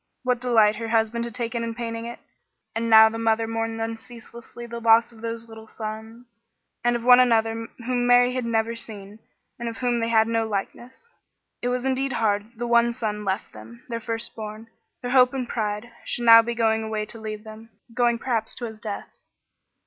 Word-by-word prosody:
What 250 Hz, -1 st, 0 dB
delight 220 Hz, -4 st, +4 dB
her 230 Hz, 0 st, -4 dB
husband 225 Hz, +1 st, 0 dB
had 235 Hz, 0 st, -8 dB
taken 235 Hz, -1 st, -3 dB
in 230 Hz, -1 st, -4 dB
painting 230 Hz, -1 st, -5 dB
it! 235 Hz, -, -7 dB, 0.6 s
And 230 Hz, +1 st, -2 dB
now 220 Hz, 0 st, +9 dB
the 225 Hz, +1 st, -4 dB
mother 225 Hz, 0 st, +1 dB
mourned 225 Hz, 0 st, -3 dB
unceasingly 230 Hz, +1 st, -8 dB
the 235 Hz, 0 st, -7 dB
loss 230 Hz, +1 st, +4 dB
of 225 Hz, -1 st, -16 dB
those 230 Hz, 0 st, -5 dB
little 220 Hz, -1 st, -12 dB
sons, 225 Hz, +2 st, -9 dB, 0.4 s
and 240 Hz, 0 st, +2 dB
of 235 Hz, -, -3 dB
one 250 Hz, 0 st, +8 dB
other 225 Hz, 0 st, +1 dB, 0.2 s
whom 245 Hz, -1 st, 0 dB
Mary 245 Hz, 0 st, +5 dB
had 255 Hz, -1 st, -2 dB
never 230 Hz, 0 st, 0 dB
seen, 210 Hz, -2 st, -8 dB, 0.4 s
and 235 Hz, 0 st, -3 dB
of 230 Hz, -, -8 dB
whom 245 Hz, -2 st, 0 dB
they 230 Hz, 0 st, -1 dB
had 220 Hz, -1 st, +4 dB
no 225 Hz, -1 st, 0 dB
likeness. 240 Hz, -, -6 dB, 0.5 s
It 245 Hz, -, -2 dB
was 250 Hz, +1 st, -2 dB
indeed 265 Hz, 0 st, 0 dB
hard 205 Hz, -3 st, +1 dB
that -, -, -29 dB
the 240 Hz, -, -3 dB
one 235 Hz, 0 st, +3 dB
son 210 Hz, -3 st, -3 dB
left 195 Hz, 0 st, -3 dB
them, 110 Hz, +2 st, -13 dB
their 230 Hz, -1 st, -4 dB
firstborn, 225 Hz, -1 st, -5 dB, 0.3 s
their 245 Hz, -, -3 dB
hope 255 Hz, 0 st, +5 dB
and 255 Hz, -2 st, -3 dB
pride, 215 Hz, +1 st, -3 dB
should 240 Hz, -, -3 dB
now 230 Hz, 0 st, +10 dB
be 235 Hz, +1 st, -4 dB
going 225 Hz, -1 st, +2 dB
away 220 Hz, -1 st, -3 dB
to 225 Hz, +1 st, -9 dB
leave 215 Hz, -1 st, -6 dB
them, 220 Hz, +1 st, -12 dB, 0.2 s
going 240 Hz, -1 st, +2 dB
perhaps 230 Hz, -2 st, -2 dB
to 240 Hz, -, -5 dB
his 220 Hz, -2 st, -9 dB
death. 210 Hz, -2 st, -6 dB
230 Hz, 200 wpm, -24 LUFS, 220-240 Hz, 0.6 s, now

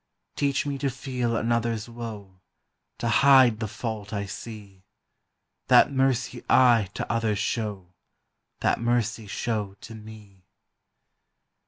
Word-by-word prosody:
Teach 140 Hz, 0 st, 0 dB
me 140 Hz, -1 st, -3 dB
to 140 Hz, -, 0 dB
feel 125 Hz, -2 st, -3 dB
another's 115 Hz, -1 st, -1 dB
woe, 110 Hz, -5 st, -9 dB, 0.6 s
To 115 Hz, -, -3 dB
hide 130 Hz, -2 st, +5 dB
the 110 Hz, -, -2 dB
fault 105 Hz, -1 st, -5 dB
I 100 Hz, -2 st, -3 dB
see; 100 Hz, -2 st, -9 dB, 0.9 s
That -, -, +6 dB
mercy 130 Hz, -3 st, 0 dB
I 120 Hz, -6 st, +5 dB
to -, -, -3 dB
others 115 Hz, -3 st, 0 dB
show, 100 Hz, -4 st, -3 dB, 0.7 s
That -, -, +1 dB
mercy 115 Hz, -2 st, 0 dB
show 105 Hz, -2 st, -3 dB
to 115 Hz, -, -10 dB
me. 105 Hz, -4 st, -13 dB
115 Hz, 120 wpm, -26 LUFS, 105-120 Hz, 0.9 s, That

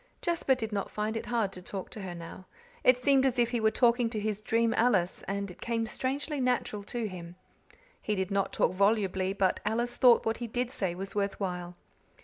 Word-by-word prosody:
Jasper 335 Hz, -6 st, +1 dB
did 225 Hz, -3 st, -4 dB
not 200 Hz, -1 st, -2 dB
find 215 Hz, +1 st, -2 dB
it 225 Hz, -, -4 dB
hard 225 Hz, -5 st, 0 dB
to 180 Hz, -, -8 dB
talk 190 Hz, +1 st, -6 dB
to 215 Hz, -, -7 dB
her 185 Hz, -2 st, -6 dB
now; 170 Hz, +2 st, -9 dB, 0.4 s
it 255 Hz, 0 st, +6 dB
seemed 270 Hz, +1 st, +3 dB
as 265 Hz, -2 st, +1 dB
if 240 Hz, -1 st, +2 dB
he 240 Hz, -, 0 dB
were 220 Hz, -1 st, +4 dB
talking 240 Hz, 0 st, +3 dB
to 225 Hz, -2 st, -3 dB
his 210 Hz, 0 st, -2 dB
dream 230 Hz, +1 st, +2 dB
Alice, 200 Hz, -7 st, +2 dB
and 200 Hz, 0 st, -3 dB
it -, -, -15 dB
came 230 Hz, -1 st, -1 dB
strangely 275 Hz, +6 st, -2 dB
natural 245 Hz, -4 st, 0 dB
to 235 Hz, 0 st, -3 dB
him. 175 Hz, -3 st, -8 dB, 0.7 s
He 210 Hz, -, -1 dB
did 190 Hz, 0 st, -2 dB
not 195 Hz, 0 st, +1 dB
talk -, -, +1 dB
volubly, 195 Hz, -1 st, +2 dB
but 195 Hz, -2 st, +1 dB
Alice 235 Hz, +3 st, -1 dB
thought 245 Hz, -2 st, +6 dB
what 225 Hz, 0 st, 0 dB
he 240 Hz, -, -4 dB
did 245 Hz, +2 st, -2 dB
say 185 Hz, -7 st, -2 dB
was 195 Hz, +2 st, -5 dB
worth 200 Hz, -1 st, -1 dB
while. 180 Hz, -2 st, -4 dB
215 Hz, 215 wpm, -30 LUFS, 195-240 Hz, 0.7 s, it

